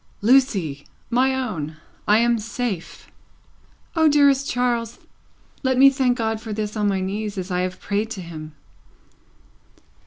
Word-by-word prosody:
"Lucie! 200 - +2 0.2
My 260 +2 +3
own! 165 - -4 0.3
I 210 - +5
am 235 0 +2
safe." 220 -4 -5 0.8
"O 320 -1 +4
dearest 280 -2 +4
Charles, 240 -2 -1 0.6
let 260 -1 +1
me 275 +1 +8
thank 260 -2 +1
God 220 -2 -1
for 220 - -7
this 210 0 -3
on 210 -1 0
my 195 -2 0
knees 205 +2 -3
as 185 0 -4
I 180 0 0
have 185 0 -3
prayed 210 +2 -2
to 205 -4 -6
Him." 155 -3 -9
220 Hz, 145 wpm, -22 LUFS, 190-250 Hz, 0.8 s, me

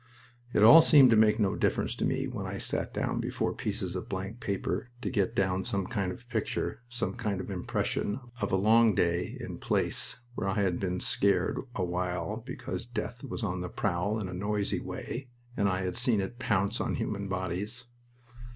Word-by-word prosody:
It 105 - +3
all 155 +10 +11
seemed 140 -6 +7
to - - +6
make 110 0 +5
no 100 -3 +2
difference - - 0
to - - 0
me - - 0
when - - -4
I - - -4
sat - - -1
down - - -1
before - - -1
pieces 90 -1 -3
of 90 - -5
blank 95 +4 -4
paper 105 +2 -2 0.2
to - - -1
get 100 -3 0
down 95 -1 +1
some 100 -1 -1
kind 100 -4 -2
of 115 +7 -10
picture, 115 +1 -2
some 120 0 -2
kind 105 -6 -2
of 95 - -5
impression, 100 +4 -1 0.2
of - - -1
a - - +3
long 110 +2 +5
day 85 +1 0
in - - -6
place - - -1 0.2
where 100 - -3
I 95 - 0
had 90 -3 0
been 90 -2 -2
scared 95 -3 +2 0.2
awhile 90 +2 -2
because 120 0 -6
death 120 0 -5
was 125 -3 -5
on 95 -3 -1
the 90 - -4
prowl 100 +3 -1
in 100 - -3
a 90 - -6
noisy 100 +2 -1
way 130 +1 -6 0.3
and 100 -1 +2
I 95 0 -1
had 90 -1 -2
seen 120 -2 +3
it 120 +6 -4
pounce 100 -4 +1
on - - -1
human 100 -1 -3
bodies. 95 +6 -3
100 Hz, 195 wpm, -30 LUFS, 95-115 Hz, 0.3 s, all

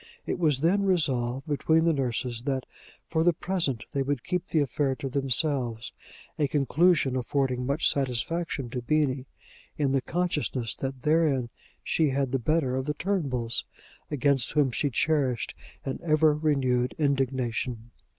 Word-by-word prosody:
It - - -2
was 150 -6 +2
then 180 +5 +3
resolved 135 -9 +1
between 160 +2 +2
the 165 -1 +3
nurses 125 -3 -1
that, 135 -2 -1 0.4
for 160 0 +1
the 175 0 +4
present, 160 -9 -1
they 140 - -1
would 135 -2 -1
keep 180 -1 -2
the - - -1
affair 140 -1 0
to 135 +1 -5
themselves, 130 -3 0 0.5
a 145 - +3
conclusion 150 0 +2
affording 130 -1 -1
much 140 +4 +2
satisfaction 135 +1 -1
to 125 - -3
Beenie, 135 0 0 0.5
in 140 -3 +1
the 135 -1 +2
consciousness 150 -8 -1
that 135 -1 -5
therein 150 -6 +2 0.3
she 160 -3 +2
had 135 -1 0
the 135 - +1
better 135 0 +1
of 130 0 -2
the 150 0 -2
Turnbulls, 135 -12 -1 0.5
against 140 -3 +1
whom 145 -4 +3
she 145 +4 0
cherished 135 -2 +1 0.3
an 135 - -3
ever 155 -1 +4
renewed 135 -5 +1
indignation. 130 -5 -1
140 Hz, 150 wpm, -27 LUFS, 125-155 Hz, 0.5 s, the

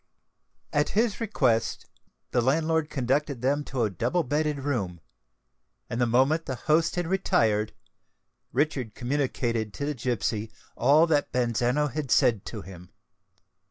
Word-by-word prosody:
At 145 0 +2
his 230 -1 +1
request, 130 - +1 0.5
the 120 - +2
landlord 155 +4 +1
conducted 135 -1 -1
them 145 +3 +1
to 130 -3 -1
a 105 - 0
double 170 - 0
bedded 150 +1 -1
room; 105 -12 -2 0.9
and 115 - -1
the 120 - +3
moment 135 +8 +2
the 130 - -2
host 160 +6 +1
had 175 -1 -1
retired, 110 - +1 0.8
Richard 130 -5 -1
communicated 120 -4 -1
to 140 - -3
the 150 - -1
gipsy 115 -3 -2 0.2
all 145 +7 +5
that 150 -3 +1
Bazzano 125 +4 +1
had 150 -3 -3
said 110 -5 +3
to - - -6
him. 90 -1 -12
130 Hz, 135 wpm, -27 LUFS, 115-150 Hz, 0.9 s, all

